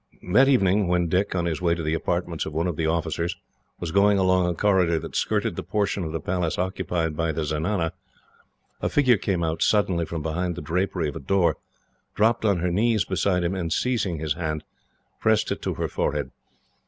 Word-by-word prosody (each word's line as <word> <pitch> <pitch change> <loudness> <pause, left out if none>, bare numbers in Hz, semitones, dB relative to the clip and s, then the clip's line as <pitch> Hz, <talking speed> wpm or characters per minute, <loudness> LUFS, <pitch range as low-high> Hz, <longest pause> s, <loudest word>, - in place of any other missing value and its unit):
That 135 +5 +6
evening 100 -7 +3
when 90 -1 +1
Dick, 95 +3 0
on 85 -1 0
his 80 -2 -2
way 85 -1 +2
to 85 - -5
the 80 +1 0
apartments 85 0 -2
of 80 - -6
one 80 +3 0
of 90 -3 -1
the 80 +1 -1
officers, 85 +1 -1 0.4
was 85 -2 -4
going 100 +2 +4
along 95 -1 +3
a 85 - -2
corridor 90 -3 +2
that - - -6
skirted - - 0
the - - -3
portion 100 -2 -1
of 80 - -4
the 80 - -2
Palace 90 +1 -1
occupied 90 -3 -1
by 80 +1 0
the 80 0 -2
zenana; 80 +3 -1 0.9
a - - 0
figure 130 -5 +4
came 95 -3 -1
out 80 0 -2
suddenly 95 -5 +2
from 80 -2 -4
behind 85 +2 -2
the 90 - -6
drapery 90 +1 -1
of 70 - -8
a - - -4
door, 90 +5 +1 0.6
dropped 110 +2 +2
on 100 -3 +3
her 90 0 0
knees 110 +2 +2
beside 95 -1 0
him, 85 +2 0
and, 85 -4 -3
seizing 100 -4 0
his 75 -1 -1
hand, 80 -2 -3 0.6
pressed 110 -1 +2
it - - -3
to - - -2
her - - -2
forehead. 75 -3 -2
90 Hz, 205 wpm, -25 LUFS, 80-95 Hz, 0.9 s, That